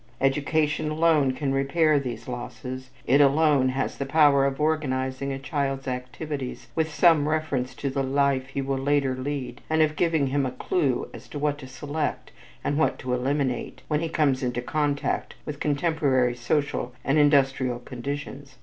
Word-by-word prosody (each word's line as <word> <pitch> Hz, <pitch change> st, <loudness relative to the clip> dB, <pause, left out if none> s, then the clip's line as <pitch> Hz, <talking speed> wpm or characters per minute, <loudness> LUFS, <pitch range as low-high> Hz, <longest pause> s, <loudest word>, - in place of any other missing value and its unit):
Education 150 Hz, +3 st, +1 dB
alone 155 Hz, -4 st, +3 dB
can 135 Hz, 0 st, -2 dB
repair 145 Hz, +2 st, +3 dB
these 125 Hz, -5 st, -6 dB
losses. 125 Hz, +1 st, -6 dB, 0.2 s
It 140 Hz, +3 st, +5 dB
alone 145 Hz, -2 st, +4 dB
has 130 Hz, +1 st, -2 dB
the 140 Hz, -, -1 dB
power 140 Hz, -2 st, +5 dB
of 135 Hz, +1 st, -3 dB
organizing 140 Hz, -3 st, -1 dB
a 135 Hz, -, -3 dB
child's 135 Hz, -1 st, -2 dB
activities 130 Hz, +2 st, -5 dB
with 160 Hz, -1 st, 0 dB
some 150 Hz, -1 st, +4 dB
reference 140 Hz, -5 st, -1 dB
to 140 Hz, 0 st, -3 dB
the 135 Hz, 0 st, -1 dB
life 135 Hz, -1 st, +1 dB
he 135 Hz, 0 st, -3 dB
will 135 Hz, 0 st, -1 dB
later 135 Hz, -1 st, +1 dB
lead 130 Hz, -2 st, -4 dB
and 160 Hz, 0 st, +4 dB
of 155 Hz, 0 st, 0 dB
giving 160 Hz, -3 st, +2 dB
him 140 Hz, +1 st, 0 dB
a 130 Hz, -, 0 dB
clue 135 Hz, -2 st, 0 dB
as 115 Hz, +1 st, -11 dB
to -, -, -7 dB
what 145 Hz, 0 st, 0 dB
to 135 Hz, -, -9 dB
select 145 Hz, +4 st, -4 dB, 0.3 s
and 145 Hz, +1 st, 0 dB
what 160 Hz, -, +2 dB
to 125 Hz, -1 st, -3 dB
eliminate 130 Hz, 0 st, -1 dB
when 150 Hz, -, +2 dB
he 165 Hz, 0 st, -2 dB
comes 145 Hz, -5 st, +1 dB
into 125 Hz, -1 st, -1 dB
contact 145 Hz, +2 st, -1 dB
with 145 Hz, -2 st, -6 dB
contemporary 140 Hz, -5 st, +1 dB
social 125 Hz, 0 st, -1 dB
and 140 Hz, +3 st, +3 dB
industrial 135 Hz, -4 st, +3 dB
conditions. 135 Hz, +2 st, -7 dB
140 Hz, 165 wpm, -25 LUFS, 130-150 Hz, 0.3 s, It